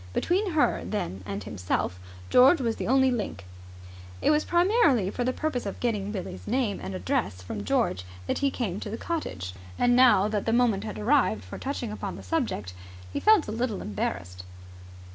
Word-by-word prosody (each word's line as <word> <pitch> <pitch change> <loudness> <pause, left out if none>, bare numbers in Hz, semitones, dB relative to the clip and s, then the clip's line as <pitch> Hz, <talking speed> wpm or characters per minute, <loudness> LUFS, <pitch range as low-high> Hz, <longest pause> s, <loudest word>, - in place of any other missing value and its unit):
Between 370 - 0
her, 310 - +2
then, 95 - -3
and 100 0 -4
himself 90 -1 -2 0.3
George 265 +7 +7
was 230 -3 -1
the - - -3
only 265 +1 +4
link. 205 - -3 0.7
It - - +3
was 300 0 +3
primarily 345 - +3
for 245 - -2
the 255 - +1
purpose 255 -5 -2
of 200 - -5
getting 210 -4 -1
Billie's 175 - -6
name 240 -7 0
and 190 - -5
address 205 - -2
from 100 +3 -5
George 90 -2 0 0.2
that - - -1
he 280 - +2
had - - -9
come 205 -6 -2
to 215 - -6
the 225 - -4
cottage. 95 - -4 0.2
And 245 0 +3
now 245 -6 +6
that 210 -1 -2
the 225 - +2
moment 230 -4 +2
had 215 - -5
arrived 215 - +2
for 95 - -9
touching 260 -5 -3
upon 205 -2 -5
the - - -10
subject, 230 - -2 0.4
he - - -1
felt 430 -6 +5
a - - -3
little 225 -1 -2
embarrassed. 90 -3 -4
225 Hz, 190 wpm, -27 LUFS, -, 0.7 s, George